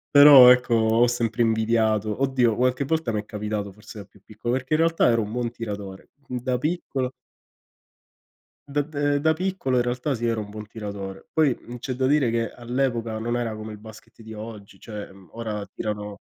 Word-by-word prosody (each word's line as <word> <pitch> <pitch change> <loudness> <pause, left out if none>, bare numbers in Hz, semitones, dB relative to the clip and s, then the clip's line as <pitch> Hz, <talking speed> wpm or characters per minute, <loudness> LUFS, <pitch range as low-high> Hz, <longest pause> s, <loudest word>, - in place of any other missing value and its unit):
però 140 -3 +10
ecco 125 -1 +3
ho 115 +2 +4
sempre 120 -1 -1
invidiato 110 -1 +1
oddio 125 -5 +2
qualche 130 +2 +1
volta 160 -4 -1
mi 105 - -1
è - - -20
capitato, 105 -1 -4
forse 105 +2 -12
da 100 - -7
più 100 +1 -23
piccolo, 110 +4 -4
perché 130 +3 -3
in 155 - +3
realtà 165 -3 +3
ero 115 -1 +3
un 105 0 -5
buon 120 -1 -2
tiratore. 100 -5 -7 0.2
Mhmm, 125 - -4
da 125 0 0
piccolo 135 -3 -2 1.6
dav 145 +1 0
da 145 -1 0
da 160 +2 +3
piccolo 180 -6 -1
in 120 - +4
realtà 125 +4 -1
sì, 120 -2 -3
ero 115 -1 0
un 105 - -8
buon 105 0 -8
tiratore. 100 -3 -7
Poi, 150 -6 +3
mhmm, 120 +1 -9
c'è 130 +2 -4
da 130 +1 -1
dire 140 -2 +3
che 115 0 -1
all'epoca 120 -2 -2
non 120 +2 -2
era 120 -2 -2
come 110 0 -7
il 105 - -9
basket 110 +2 -14
di 110 0 -10
oggi, 105 -3 -10
cioè, 105 -2 -8
mhmm, 95 -1 -17
ora 110 -3 -5
tirano 105 0 -5
115 Hz, 200 wpm, -24 LUFS, 105-130 Hz, 1.6 s, però